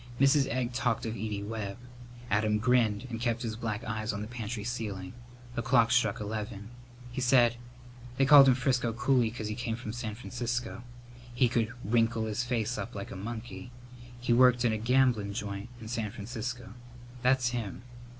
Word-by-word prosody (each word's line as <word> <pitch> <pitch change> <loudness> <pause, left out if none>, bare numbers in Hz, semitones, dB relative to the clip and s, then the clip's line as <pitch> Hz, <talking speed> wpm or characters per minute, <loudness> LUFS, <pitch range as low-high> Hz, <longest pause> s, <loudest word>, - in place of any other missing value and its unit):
Mrs. 135 0 +5
Egg 125 0 -2
talked 120 -3 0
of 110 - -2
Edie 105 -2 -4
Webb. 105 -1 -4 0.5
Adam 105 +1 +2
grinned 115 -1 +2
and 115 0 -4
kept 120 0 0
his 110 -2 -3
black 110 -2 -3
eyes 110 0 -2
on 100 0 -4
the - - -6
pantry 115 -2 -5
ceiling. 105 -6 -4 0.4
The 120 - -2
clock 120 -1 +3
struck 120 -4 +2
eleven. 105 0 -5 0.4
He 130 - -3
said, 120 -2 +4 0.6
"They 135 - +4
called 140 0 +9
him 130 - +6
Frisco 125 -2 +1
Cooley 125 -1 +2
'cause 110 -1 -5
he 105 - -2
came 115 0 -3
from 110 -2 -6
San 115 -3 -4
Francisco. 120 0 -4 0.5
He 125 0 +4
could 115 -1 0
wrinkle 115 +1 +2
his 110 +2 -1
face 120 -1 -1
up 120 - -6
like 100 - -6
a - - -6
monkey. 110 0 -6 0.5
He 120 0 +1
worked 125 0 +5
in 115 - +3
a 110 - -2
gamblin' 120 -3 +2
joint 100 0 -4
in 110 - -9
San 110 -2 -2
Francisco. 120 +1 -6 0.5
That's 125 0 +3
him." 115 -4 -4
115 Hz, 180 wpm, -30 LUFS, 110-125 Hz, 0.6 s, called